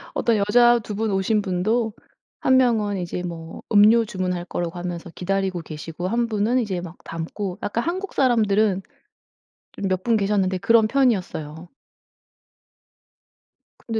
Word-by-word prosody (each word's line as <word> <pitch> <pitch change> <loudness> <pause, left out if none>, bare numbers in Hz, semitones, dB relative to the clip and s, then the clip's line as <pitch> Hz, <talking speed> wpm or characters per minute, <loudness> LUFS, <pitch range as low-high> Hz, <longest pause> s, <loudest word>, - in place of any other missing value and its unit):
어떤 230 -2 +2
여자 240 +4 +4
2 210 -2 -7
분 220 +1 -1
오신 195 +3 +1
분도 215 +5 0 0.5
1 260 - +3
명은 220 -6 +2
이제 180 -1 -4
뭐 165 -2 -7
음료 215 +3 +6
주문할 185 -4 -3
거라고 175 -1 -4
하면서 175 -1 -5
기다리고 190 0 -2
계시고 165 +2 -6
1 235 +4 0
분은 225 +3 +1
이제 195 -6 -2
막 175 -1 -9
담고. 180 +4 -5
약간 225 +3 -2
한국 375 +4 -3
사람들은 215 -6 +2 0.9
좀 195 - -3
몇 185 0 -1
분 230 -2 +2
계셨는데 195 -2 +1
그런 220 +2 +4
편이었어요. 180 - -1 2.1
근데 225 -1 -3
200 Hz, 270 characters per minute, -23 LUFS, 180-230 Hz, 2.1 s, 음료